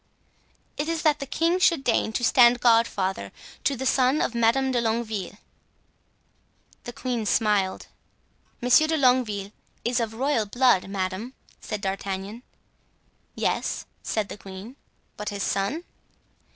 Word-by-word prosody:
"It 295 +2 -2
is 330 -1 -2
that 300 -2 +3
the 275 - -5
king 335 +6 +1
should 335 -6 +3
deign 230 -3 +1
to 245 - -2
stand 245 0 +6
godfather 200 - +2 0.3
to 280 - +1
the 265 +1 -5
son 260 +2 +3
of - - 0
Madame 235 +3 +2
de 245 -2 +1
Longueville." 220 -4 -2 1.5
The 240 - -5
queen 240 -3 -3
smiled. 205 -3 +1 0.8
"Monsieur 250 +6 +5
de 320 0 +1
Longueville 245 -7 +2 0.3
is 240 +1 +1
of 225 -1 -3
royal 255 -3 0
blood, 240 -4 +3
madame," 195 +5 -4 0.2
said 210 -2 -5
D'Artagnan. 195 +2 -4 0.9
"Yes," - - -1 0.2
said 215 -2 -2
the - - -8
queen; 195 +6 -10 0.4
"but 210 0 -4
his 200 -1 -4
son?" 200 - -1
230 Hz, 135 wpm, -25 LUFS, 200-260 Hz, 1.5 s, stand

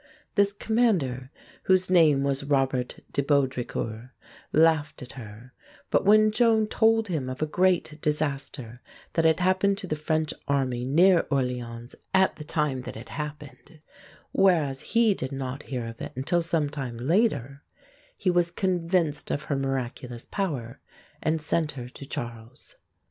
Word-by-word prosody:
This 200 -1 +3
commander, 200 - 0 0.4
whose 185 0 +4
name 155 -6 +5
was 140 0 0
Robert 135 -3 0
de 140 - +1
Baudricourt 140 0 +3
(Bó - - -6
dree 125 - -3
koor), 115 +2 -5 0.4
laughed 155 -3 +2
at 125 - -10
her; 115 +1 -11 0.4
but - - +2
when 215 +1 +6
Joan 220 -1 +3
told 225 +1 +2
him 150 -8 -2
of 130 +4 -3
a - - +2
great 170 -2 +1
disaster 140 -5 -2 0.3
that 165 - +1
had 160 +1 +4
happened 190 +2 +2
to 200 - -6
the 155 - -2
French 155 0 -1
army 130 -3 0
near 170 +6 +5
Orléans 125 -3 -2 0.2
at 190 0 +3
the 150 - -7
time 150 -3 -1
that 125 - -8
it 115 - -10
happened, 150 +1 -8 0.5
whereas 160 -9 +2
he 230 -2 +3
did 130 -7 -5
not 135 0 -4
hear 125 -4 -3
of 115 0 -8
it - - -6
until 140 +7 +1
sometime 145 -7 -2
later, 140 - 0 0.6
he 185 - +1
was 175 -1 +2
convinced 175 -4 0
of 145 - -2
her 145 - -2
miraculous 130 -3 -4
power, 140 - -3 0.4
and 160 +1 +1
sent 155 0 0
her 125 -3 -7
to 135 +2 -11
Charles. 120 -1 -8
150 Hz, 155 wpm, -26 LUFS, 130-180 Hz, 0.6 s, when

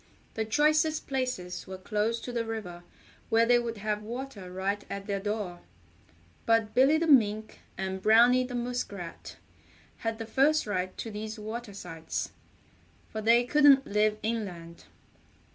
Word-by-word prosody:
The 220 - -2
choicest 305 +6 +2
places 255 -10 -3
were 190 0 -6
close 215 +4 -1
to 245 - -6
the 235 -1 -1
river 215 -6 -6 0.5
where 230 +1 +4
they 240 +1 +5
would 230 -2 -4
have 210 0 -2
water 230 -4 -7
right 195 +2 -2
at 200 0 -5
their 200 -1 -2
door. 205 -3 -3 0.9
But 225 -2 +2
Billy 270 +5 +5
the 335 - 0
Mink 220 -7 +3 0.2
and 190 0 -3
Browny 240 +5 +6
the 250 -1 -6
Muskrat 240 -8 -5 0.6
had 225 -1 -3
the 225 - -5
first 275 +7 +3
right 185 -3 -3
to 225 - -5
these 215 +1 -6
water 215 0 -6
sites, 165 -4 -5 0.8
for 220 - -5
they 230 +2 +5
couldn't 280 +1 +5
live 210 +1 +1
inland. 180 -7 -4
220 Hz, 145 wpm, -29 LUFS, 200-245 Hz, 0.9 s, Browny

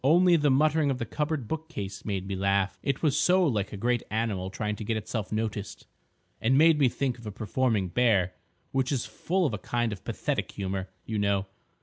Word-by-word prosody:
"Only 175 +5 +6
the 150 -3 +3
muttering 150 +2 +3
of 135 - 0
the 120 - -3
cupboard 150 -1 -2
bookcase 155 -11 -5
made 95 -3 -2
me 95 0 -3
laugh. 100 0 +1
It 140 +2 -2
was 145 -4 +3
so 180 +4 +4
like 105 -9 0
a 105 - -6
great 120 +3 +1
animal 105 -4 -1
trying 105 +2 -3
to 110 - -5
get 110 +1 -1
itself 110 0 -4
noticed, 110 -2 -3 0.6
and 130 +4 +3
made 160 0 +6
me 135 -3 +5
think 130 -1 -2
of 115 - -10
a - - -3
performing 110 -1 0
bear—which 115 +5 0
is 130 -4 0
full 185 +1 -1
of 135 - 0
a 105 - -3
kind 120 -1 -1
of 95 - -10
pathetic - - -2
humour, 95 -1 -3 0.2
you 110 -1 -2
know. 100 -1 +1
115 Hz, 205 wpm, -28 LUFS, 100-140 Hz, 0.6 s, Only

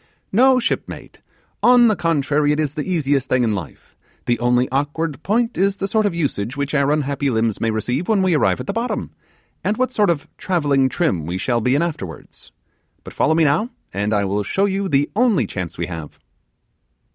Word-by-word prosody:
'No, 255 +5 +5
shipmate; 235 - -4 0.4
on 245 -1 +6
the 215 - +3
contrary, 150 -3 +1
it 150 - 0
is 150 -2 -1
the 155 +5 -4
easiest 140 -5 0
thing 125 -1 +2
in 115 - +1
life: 95 -7 -7 0.3
the 120 - 0
only 125 +1 +2
awkward 145 +2 -2
point 230 +4 0
is 195 +1 +2
the 195 - -2
sort 215 +1 +2
of 185 - -3
usage 135 -6 -2
which 140 +1 -2
our 140 -1 +2
unhappy 145 -1 0
limbs 110 -3 0
may 115 - +1
receive 120 - -2
when 210 -4 +2
we 185 -2 +2
arrive 150 - +2
at 125 - -5
the - - -3
bottom, 235 +2 -3 0.5
and 210 +2 0
what 255 0 0
sort 210 -5 +2
of 160 -4 -1
travelling 145 -7 +1
trim 125 - -1
we 90 +2 -2
shall 120 +4 0
be 125 +4 +2
in 150 - +2
afterwards. 95 - -7 0.5
But - - -10
follow 160 - +2
me 165 - +3
now, 155 +11 +2 0.2
and 100 +3 -1
I 100 -2 +1
will 100 +2 -1
show 190 - 0
you 195 -1 -1
the 145 0 +2
only 215 - +3
chance 90 -3 -6
we 85 - -2
have. 80 -4 -8
145 Hz, 205 wpm, -20 LUFS, 120-190 Hz, 0.5 s, on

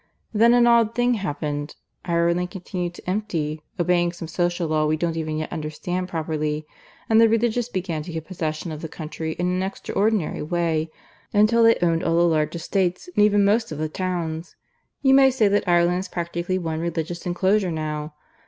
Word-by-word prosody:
Then 230 +3 +5
an 240 -1 +5
odd 230 -1 +4
thing 245 0 +2
happened. 150 -7 -3 0.3
Ireland 170 +1 +1
continued 180 -1 -5
to - - -14
empty, 165 -6 -2 0.2
obeying 175 0 +2
some 170 -1 -7
social 175 +1 -1
law 155 -1 +1
we 155 +1 +1
don't 165 0 -1
even 155 -1 -2
yet 155 - -4
understand 175 +3 -4
properly; 155 -2 -2 0.4
and 225 0 +5
the 225 - +6
Religious 235 +1 +1
began 180 -7 -3
to 170 +3 -7
get 160 -1 -5
possession 160 -2 -4
of 155 0 -6
the 160 - -4
country 160 0 -5
in 175 - -2
an 180 +1 0
extraordinary 200 0 -1
way, 160 0 -1 0.4
until 215 +3 +4
they 230 0 +6
owned 165 -1 +2
all 165 0 +1
the 170 - +5
large 155 -1 +1
estates, 180 - -1
and 210 - +5
even 205 -1 +4
most 220 +1 +2
of 155 - -4
the 155 +1 -2
towns. 170 -2 -3 0.5
You 270 -1 +5
may 270 0 +7
say 240 -5 +2
that 205 -1 +1
Ireland 175 0 +3
is 190 - -5
practically 175 +1 -3
one 160 -3 -3
Religious 170 +1 -3
Enclosure 190 +2 +2
now. 155 -1 -4
175 Hz, 185 wpm, -23 LUFS, 160-200 Hz, 0.5 s, may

